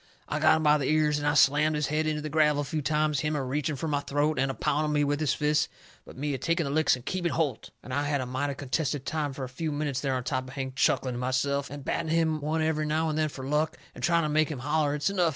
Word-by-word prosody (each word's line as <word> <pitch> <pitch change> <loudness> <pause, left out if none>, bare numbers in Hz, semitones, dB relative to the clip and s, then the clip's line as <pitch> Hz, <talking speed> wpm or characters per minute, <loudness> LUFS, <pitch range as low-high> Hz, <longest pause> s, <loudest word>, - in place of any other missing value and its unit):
I - - -2
got - - +5
him 160 - -1
by 150 0 +5
the 135 - -1
ears 150 -1 +2
and 145 - -2
I 145 - +2
slammed 150 +2 +4
his 150 -1 0
head 155 +2 0
into 150 -1 -1
the 155 - -3
gravel 150 -1 +3
a - - -6
few 155 +2 -2
times, 150 0 +1
him 150 +1 -1
a 140 - -1
reaching 145 +3 -1
fur 150 +4 -4
my 145 -2 +1
throat, 145 0 0
and 135 +1 +1
a 135 - -3
pounding 150 0 0
me 145 0 +3
with 145 0 0
his 155 -3 +1
fists, 150 0 +1 0.4
but - - -13
me 145 +1 -2
a 135 - -3
taking 170 +5 0
the 140 - -3
licks 155 -2 +3
and 125 - -12
keeping 175 -3 -1
holt. 145 -8 -1
And 130 - -7
I 145 +2 0
had 145 -1 0
a 130 - -2
mighty 135 +3 -2
contented 140 0 -2
time 155 -3 -1
fur 135 0 -6
a - - -3
few 155 +5 -4
minutes 145 -3 -2
there 135 -2 0
on 125 - -2
top 130 0 -2
of 130 - -10
Hank, 130 -1 -4
chuckling 130 -1 +2
to 120 - -4
myself, 130 +2 0
and 140 -1 -8
batting 160 - -1
him 160 -1 +1
one 155 +2 0
every 155 -1 0
now 160 +1 +1
and 155 - -2
then 155 -1 +1
fur 135 -2 -8
luck, 150 +3 0 0.2
and - - -10
trying 170 -1 +3
to 155 - 0
make 155 0 +2
him 150 - -4
holler 150 +2 0
it's 150 +5 0
enough. 180 -4 +2
150 Hz, 295 wpm, -28 LUFS, 140-155 Hz, 0.4 s, got